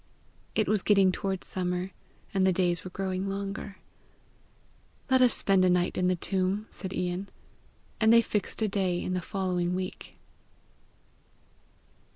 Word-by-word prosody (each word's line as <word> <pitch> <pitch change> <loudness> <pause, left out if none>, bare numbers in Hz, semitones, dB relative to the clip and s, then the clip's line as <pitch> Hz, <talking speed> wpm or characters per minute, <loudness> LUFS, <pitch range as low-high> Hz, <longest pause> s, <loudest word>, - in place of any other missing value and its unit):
It 215 - +2
was 210 0 +2
getting 195 -2 +4
toward 190 0 -3
summer, 180 0 -3 0.4
and 195 -1 +2
the 190 - +4
days 175 -1 +1
were 185 - -6
growing 190 +1 -3
longer. 195 0 -5 1.3
"Let 260 0 +5
us 250 -2 +6
spend 195 -3 +3
a 185 - +4
night 180 0 +2
in 180 - +1
the 185 - +2
tomb!" 190 +3 -1
said 190 - -7
Ian; 180 +1 -3 0.7
and 220 0 +5
they 230 0 +7
fixed 210 +1 -2
a - - +2
day 190 -3 0
in 185 - -3
the 180 - -1
following 180 -2 -1
week. 185 0 -6
190 Hz, 150 wpm, -28 LUFS, 180-200 Hz, 1.3 s, they